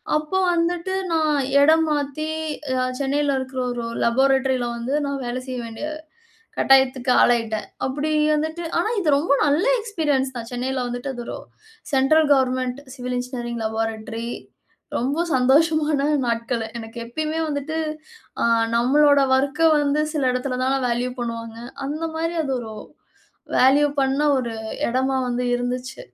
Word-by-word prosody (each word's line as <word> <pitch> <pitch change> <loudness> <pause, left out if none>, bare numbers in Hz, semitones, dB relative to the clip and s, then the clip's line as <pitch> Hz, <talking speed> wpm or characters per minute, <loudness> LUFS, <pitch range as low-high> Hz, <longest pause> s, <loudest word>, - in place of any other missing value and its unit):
அப்போ 305 +5 -1 0.2
வந்துட்டு 345 +2 0 0.2
நான் 310 -2 +2 0.2
இடம் 320 +2 +5
மாத்தி 295 +1 -2 0.7
சென்னைல 280 0 +1
இருக்கிற 260 0 -5
ஒரு 240 -1 -3
ஒரு 230 - -5
லேபாரட்டரில 265 +1 +2
வந்து 245 +4 -3
நான் 280 -1 -3
வேலை 245 +1 -3
செய்ய 255 -1 -4
வேண்டிய 230 +6 -6 0.7
கட்டாயத்துக்கு 265 -1 +3
ஆளாயிட்டேன். 230 -3 +2 0.2
அப்டி 290 +4 -2 0.2
வந்துட்டு 315 +3 -2 0.2
ஆனா 355 - +1
இது 325 - -1
ரொம்ப 290 -1 0
நல்ல 295 +4 +2 0.2
எக்ஸ்பீரியன்ஸ் 295 - -1
தான், 230 -1 -6
சென்னைல 260 +2 -2
வந்துட்டு 245 +3 -4
அது 240 -1 -6
ஒரு - - -5 0.6
central 290 +4 +4
government 255 0 +1
civil 250 -1 -4
engineering 240 -2 -4
laboratory 225 +1 -3 0.7
ரொம்ப 275 +6 -1 0.2
சந்தோஷமா 300 +5 +3 0.2
தான் 300 +1 +1
நாட்களு. 230 0 -1
எனக்கு 225 +1 -9
எப்பயுமே 310 +6 -3
வந்துட்டு, 300 +1 -3 0.6
அ - - +2 0.3
நம்மளோட 285 +4 +4 0.2
ஒர்க்க 280 +4 0 0.2
வந்து 290 +1 +1
சில 285 -4 0
இடத்துல 250 0 -2
தான 265 +1 +2
வேல்யூ 245 +1 -1
பண்ணுவாங்க. 230 -1 -5 0.3
அந்த 310 +3 -3
மாரி 330 +1 -1
அது 270 -3 -2
ஒரு 220 -2 -8 0.8
வேல்யூ 275 +3 +5
பண்ண 270 +1 +1 0.2
ஒரு 240 -3 -2 0.4
இடமா 260 +2 0
வந்து 245 +1 -1
இருந்துச்சி. 250 - -3
265 Hz, 140 wpm, -22 LUFS, 245-295 Hz, 0.8 s, இடம்